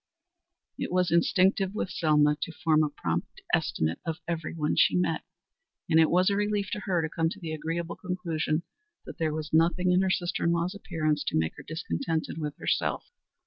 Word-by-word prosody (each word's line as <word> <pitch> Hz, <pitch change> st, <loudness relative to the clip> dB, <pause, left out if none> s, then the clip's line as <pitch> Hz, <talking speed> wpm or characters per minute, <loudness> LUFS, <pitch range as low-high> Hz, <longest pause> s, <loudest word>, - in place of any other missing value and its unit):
It -, -, -3 dB
was 180 Hz, -2 st, +2 dB
instinctive 190 Hz, +3 st, +3 dB
with 190 Hz, -, -2 dB
Selma 150 Hz, -2 st, +3 dB
to -, -, -2 dB
form 160 Hz, -2 st, +2 dB
a 150 Hz, -, 0 dB
prompt -, -, -4 dB
estimate 80 Hz, +1 st, +1 dB
of 165 Hz, -1 st, -3 dB
every 165 Hz, -2 st, -3 dB
one 150 Hz, -2 st, -1 dB
she -, -, +4 dB
met, 170 Hz, -3 st, +1 dB, 0.7 s
and 160 Hz, -, +4 dB
it 160 Hz, -, +5 dB
was 185 Hz, +3 st, +4 dB
a -, -, +1 dB
relief 205 Hz, -1 st, 0 dB
to -, -, -2 dB
her 180 Hz, -5 st, 0 dB
to -, -, 0 dB
come 165 Hz, 0 st, 0 dB
to 190 Hz, -, -8 dB
the 165 Hz, -4 st, -5 dB
agreeable 165 Hz, +2 st, -3 dB
conclusion 170 Hz, -4 st, -2 dB, 0.4 s
that -, -, -10 dB
there 160 Hz, -1 st, +1 dB
was 155 Hz, 0 st, -5 dB
nothing 175 Hz, +3 st, +3 dB
in 180 Hz, +1 st, +4 dB
her 190 Hz, -, +1 dB
sister 175 Hz, -2 st, -1 dB
in 170 Hz, -, +3 dB
law's 170 Hz, +2 st, 0 dB
appearance 160 Hz, -7 st, -1 dB
to -, -, 0 dB
make 80 Hz, 0 st, 0 dB
her -, -, -9 dB
discontented 160 Hz, -, -3 dB
with 150 Hz, -2 st, -4 dB
herself. -, -, -1 dB
165 Hz, 195 wpm, -28 LUFS, 155-180 Hz, 0.7 s, it